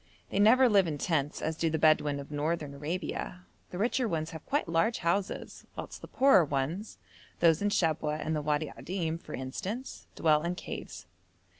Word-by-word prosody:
They 195 - 0
never 250 +5 +6
live 200 -5 +4
in 150 -2 -2
tents, 145 -2 -1
as 160 - -1
do 165 +1 0
the 160 - 0
Bedouin 150 -2 +3
of 140 +1 -9
Northern 150 0 -2
Arabia; 170 +4 -4 0.2
the 180 - -7
richer 240 +4 +1
ones 160 -4 -2
have 160 -1 -8
quite 285 -5 0
large 170 +8 +2
houses, 185 +3 -2
whilst - - -7
the - - -9
poorer 265 -9 +5
ones 150 +8 -3 0.4
those 165 0 +4
in 205 - +2
Shabwa 155 -5 +1
and 155 +1 -2
the 150 - -1
Wadi 150 0 -1
Adim, 165 -3 -3
for - - -7
instance 195 - -5
dwell 155 -2 +3
in 170 +2 -2
caves. - - -7
165 Hz, 180 wpm, -30 LUFS, 150-195 Hz, 0.4 s, never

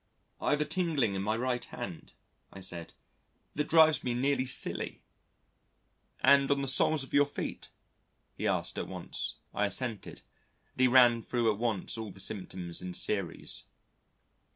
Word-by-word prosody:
"I've 150 0 +1
a - - +1
tingling 155 - 0
in 95 - -2
my 110 +3 0
right 125 0 -1
hand," - - -8 0.4
I 95 - -10
said, 85 -3 -7 0.6
"that 150 +1 -1
drives 160 -1 +5
me 125 -1 -1
nearly 130 +1 +1
silly." 130 - -1 1.2
"And 140 0 +5
on 140 -1 +2
the - - -2
soles 135 +2 +3
of 135 - -12
your 145 0 +5
feet?" - - -6 0.6
he - - -3
asked - - -1
at - - -4
once. - - -4 0.2
I 105 - +1
assented, 110 +2 -3 0.5
and - - -19
he 130 - +7
ran 120 -2 +6
thro' 115 -1 +1
at 105 - -5
once 115 -2 -1
all 110 -1 -5
the 95 - -13
symptoms 90 -3 -2
in 90 -1 -5
series. 100 -5 -1
120 Hz, 155 wpm, -31 LUFS, 100-140 Hz, 1.2 s, he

